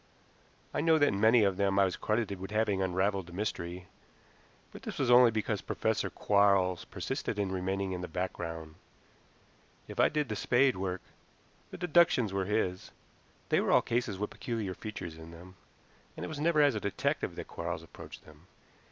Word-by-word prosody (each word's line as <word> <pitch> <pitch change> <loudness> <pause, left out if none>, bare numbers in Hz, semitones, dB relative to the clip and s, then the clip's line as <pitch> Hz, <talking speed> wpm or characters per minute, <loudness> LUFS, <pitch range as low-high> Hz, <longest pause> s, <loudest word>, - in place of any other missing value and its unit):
I - - 0
know 160 0 +4
that 145 -2 +4
in 100 - -2
many 110 +1 +6
of 100 -2 +1
them 100 -1 +1
I 100 - +6
was 90 - -2
credited 105 -3 -1
with 95 - -6
having 105 -2 +1
unraveled 95 0 0
the 90 - -12
mystery, 90 -3 -4 0.9
but - - -11
this - - -6
was 120 - +1
only 120 0 +8
because 110 -2 -2
Professor 110 0 -1
Quarles 100 -3 +2
persisted - - -4
in 100 -2 -1
remaining 95 +1 -2
in 90 -1 -4
the 90 - -4
background. 80 -3 -5 1.1
If - - -8
I - - +5
did 150 -2 -1
the 110 - -3
spade 130 +4 +3
work, 95 -1 -3 0.7
the - - -9
deductions 170 - +3
were 95 -1 0
his. 95 -3 -1 0.6
They - - +3
were - - 0
all - - +5
cases 120 -4 -1
with 105 +2 -3
peculiar 110 -6 -4
features 90 -6 -7
in 80 0 -10
them, 85 +2 -12 0.6
and - - -4
it - - -6
was 155 -2 -6
never 155 -1 +3
as 145 -2 +4
a 105 - -2
detective 100 -1 -2
that - - -7
Quarles 85 -1 -5
approached 80 - -12
them. 75 +3 -17
100 Hz, 185 wpm, -31 LUFS, 90-110 Hz, 1.1 s, only